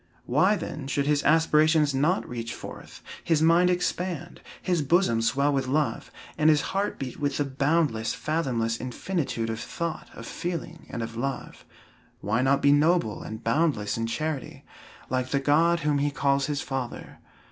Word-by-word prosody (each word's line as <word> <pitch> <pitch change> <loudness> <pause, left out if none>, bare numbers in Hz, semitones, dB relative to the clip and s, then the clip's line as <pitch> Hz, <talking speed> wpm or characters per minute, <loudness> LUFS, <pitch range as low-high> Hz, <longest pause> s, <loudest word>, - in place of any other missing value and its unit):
Why, 185 +11 +3
then, 155 -6 -6
should 140 +1 0
his 145 -1 +2
aspirations 155 -1 +4
not 150 +8 +1
reach 115 -1 -5
forth, - - -10 0.2
his 165 -3 +2
mind 170 +2 +5
expand, 180 -1 -2 0.2
his 180 -3 0
bosom 145 -6 +2
swell 140 +5 +2
with 135 -2 0
love, 150 +3 -1 0.3
and 155 0 +5
his 150 -1 +4
heart 200 +1 -1
beat 130 -2 -6
with 145 -1 -1
the 145 - +1
boundless, 140 -4 0
fathomless 125 -5 -1
infinitude 125 -3 -2
of 110 - -4
thought, 170 +4 -5
of 115 - -9
feeling, 170 +1 -5
and 115 - -4
of 115 0 -6
love? 135 +4 -4 0.5
Why 110 +4 0
not 135 +1 +2
be 140 - +6
noble 150 -6 +2
and 110 0 -7
boundless 120 -3 +1
in 115 0 -2
charity, 155 +2 -4 0.5
like 130 0 0
the 140 - +1
God 165 +5 +3
whom 150 -2 +1
he 145 +1 +1
calls 140 -1 +1
his 145 -1 -2
father? 130 -3 -5
145 Hz, 165 wpm, -26 LUFS, 130-165 Hz, 0.5 s, be